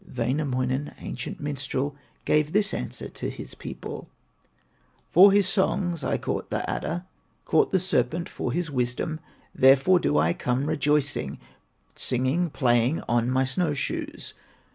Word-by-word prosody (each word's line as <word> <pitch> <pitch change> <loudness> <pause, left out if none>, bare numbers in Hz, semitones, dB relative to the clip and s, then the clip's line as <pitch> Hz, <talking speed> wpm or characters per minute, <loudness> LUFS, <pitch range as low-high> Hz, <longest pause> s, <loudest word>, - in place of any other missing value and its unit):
Wainamoinen, 130 +2 -1
ancient 125 - -6
minstrel, 140 -1 -3 0.3
Gave 150 0 +2
this 210 0 +2
answer - - -4
to - - -5
his - - -8
people: - - -8 1.0
"For 195 +2 +8
his 200 -1 +4
songs 190 -4 0
I - - 0
caught - - -3
the - - -2
adder, 175 +2 -3 0.4
Caught 430 - +3
the 190 - +3
serpent 170 -1 0
for - - -4
his 170 -3 -2
wisdom; 125 +5 -1 0.3
Therefore 135 +8 +5
do 75 - +1
I 80 +3 +3
come 125 +7 -1
rejoicing, 145 -1 0 0.6
Singing, 130 +8 0
playing, 125 +1 +2
on 120 0 +1
my 130 +1 +2
snow 145 +4 0
shoes. 135 - -4
145 Hz, 135 wpm, -26 LUFS, 130-175 Hz, 1.0 s, For